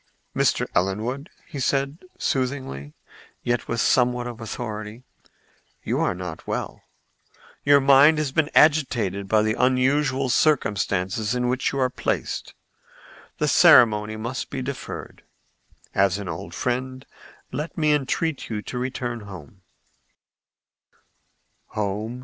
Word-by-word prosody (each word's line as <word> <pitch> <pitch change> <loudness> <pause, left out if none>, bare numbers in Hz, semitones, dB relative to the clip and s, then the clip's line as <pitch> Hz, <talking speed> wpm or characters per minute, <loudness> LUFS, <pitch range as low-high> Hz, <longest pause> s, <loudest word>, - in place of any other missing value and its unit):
"Mr. - - +2
Ellenwood," 110 - -1 0.3
said 140 +2 0
he, 185 - -18
soothingly, 130 - -2 0.5
yet 120 0 -1
with 115 - -2
somewhat 125 0 +2
of 120 -1 -7
authority, 110 +1 -6 0.8
"you - - -1
are - - +1
not 90 -3 -7
well. - - -4 0.8
Your 145 0 +6
mind 140 +3 +6
has 150 -3 -1
been 150 +1 +1
agitated 120 - +3
by 105 +1 +3
the 110 0 +1
unusual 130 +2 +2
circumstances 105 -6 +1
in 125 0 0
which 125 +1 0
you 140 - -4
are 130 -2 +1
placed. - - -3 0.8
The - - 0
ceremony 110 -2 +6
must 120 +4 -4
be 130 - -4
deferred. 135 0 -7 0.7
As 95 -1 +2
an 100 -2 -6
old 85 0 -6
friend, 130 +1 -3 0.5
let 150 +5 -5
me 155 -2 +3
entreat 150 +2 -1
you 105 -2 -4
to 125 - -5
return 125 -2 -3
home." 95 0 -11
125 Hz, 120 wpm, -24 LUFS, 105-135 Hz, 0.8 s, Your